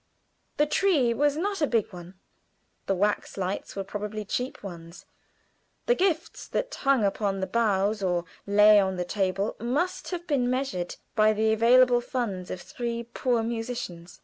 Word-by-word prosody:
The 295 - +4
tree 300 -7 +2
was 290 +3 +1
not 395 +2 -2
a 300 - +3
big 225 -5 0
one. 175 +1 -10 0.7
The 195 - +1
wax 205 +3 -1
lights 190 +1 -3
were 195 - -3
probably 210 +2 -5
cheap 250 +4 -3
ones; 170 -3 -9 0.8
the 485 - +4
gifts 360 -6 -1
that - - -2
hung 275 -5 +2
upon 195 -1 -1
the 190 - -1
boughs 210 -1 +1
or 175 -2 0 0.2
lay 210 +1 +7
on 190 -1 +1
the 180 - -2
table 195 +2 -1
must 285 - -1
have 350 -2 -4
been 270 -7 +1
measured 255 -9 -2 0.2
by 215 0 +4
the 220 +1 +2
available 245 +2 +5
funds 220 -8 -3
of 180 - -6
three 235 -5 -4
poor 245 -3 +1
musicians. 225 -7 -5
220 Hz, 160 wpm, -27 LUFS, 195-255 Hz, 0.8 s, lay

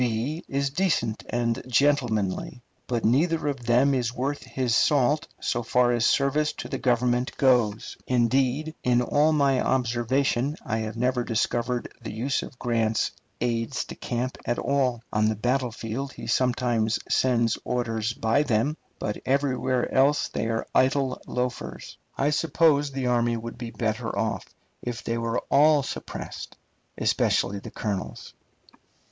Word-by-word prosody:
is 140 0 -1
decent 140 - 0
and 115 0 0
gentlemanly, 125 -5 +1 0.2
but 120 -2 -1
neither 155 +7 +2
of 135 -5 -3
them 125 +4 +4
is 125 -3 0
worth 135 +3 -2
his 125 -3 -2
salt 145 +2 +3
so 120 - -1
far 120 +1 +2
as 120 -1 +2
service 145 +2 +2
to - - -7
the 135 - -2
Government 125 0 +1
goes. 120 -6 +2
Indeed, 130 +5 +1
in 125 0 +2
all 150 +5 +3
my 140 -4 +3
observation, 125 +3 +1
I 110 -2 -1
have 110 +1 -4
never 125 +1 +1
discovered 120 +1 -1
the 115 - -6
use 125 +6 -1
of 130 - -9
Grant's 115 -3 0 0.3
aides 120 +2 -1
de - - -8
camp 125 +1 -3
at 120 - -1
all. 130 -4 0
On 110 0 +3
the 110 - 0
battlefield 125 +2 -2
he - - -9
sometimes 120 -3 +1
sends 120 -3 +2
orders 115 -2 -1
by 115 +5 +2
them, 140 +3 +1 0.2
but 105 - -4
everywhere 130 -2 0
else 140 +3 +3
they 115 - -2
are 115 0 -1
idle 130 0 +2
loafers. 125 0 -4 0.2
I 145 +2 +2
suppose 150 -2 +2
the 135 -1 -3
army 120 -1 +2
would 115 +1 -7
be 120 -2 -5
better 115 +1 -2
off 110 -1 -1 0.4
if 120 -1 -5
they 115 0 -2
were 115 0 -1
all 145 0 +5
suppressed, - - -7 0.4
especially 100 0 +1
the - - -9
colonels. 100 -4 -4
125 Hz, 145 wpm, -26 LUFS, 115-135 Hz, 0.4 s, all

